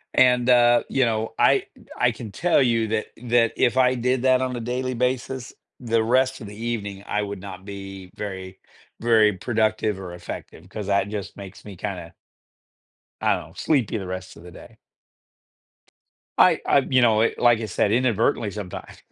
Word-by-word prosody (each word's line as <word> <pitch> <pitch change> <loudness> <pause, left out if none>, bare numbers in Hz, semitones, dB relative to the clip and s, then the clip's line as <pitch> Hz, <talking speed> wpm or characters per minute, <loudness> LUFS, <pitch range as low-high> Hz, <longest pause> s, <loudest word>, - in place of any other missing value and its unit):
And, 125 -1 +4
uh, 120 -1 +5
you 130 -2 +2
know, 110 -1 -2
I - - +4 0.3
I 125 - +3
can 110 -2 -9
tell 170 - +2
you 115 -2 +1
that 110 0 -2 0.2
that 115 -1 +3
if 125 +2 +2
I 130 0 +4
did 125 +1 0
that 130 -1 +4
on 130 -1 -2
a - - -4
daily 125 +2 -3
basis, 125 +1 -2 0.3
the 115 -2 +1
rest 130 +2 +1
of 105 - -7
the 105 - -10
evening, 105 -4 -4
I 105 - 0
would 100 -1 -5
not 95 -1 -9
be 95 -2 -9
very 95 -2 -7 0.4
very 110 -3 +4
productive 110 0 0
or 90 -2 -7
effective 90 0 -9
cause 105 -1 -6
that 100 0 +1
just 105 -2 -6
makes 100 -1 -10
me 100 -2 -10
kinda 90 -4 -6 1.1
I - - +2
don't - - -11
sleepy 125 -8 +1
the 95 - -6
rest 95 -1 -7
of 85 - -14
the 90 - -11
day. - - -14 1.6
I - - +5
I, - - +5
you 130 -2 +3
know, 110 -2 +4
eh, 115 - +2
like 120 -2 +4
I 110 - -3
said, 100 +1 0
inadvertently 115 -3 +1
sometimes, 100 -4 -8
110 Hz, 180 wpm, -23 LUFS, 100-125 Hz, 1.6 s, uh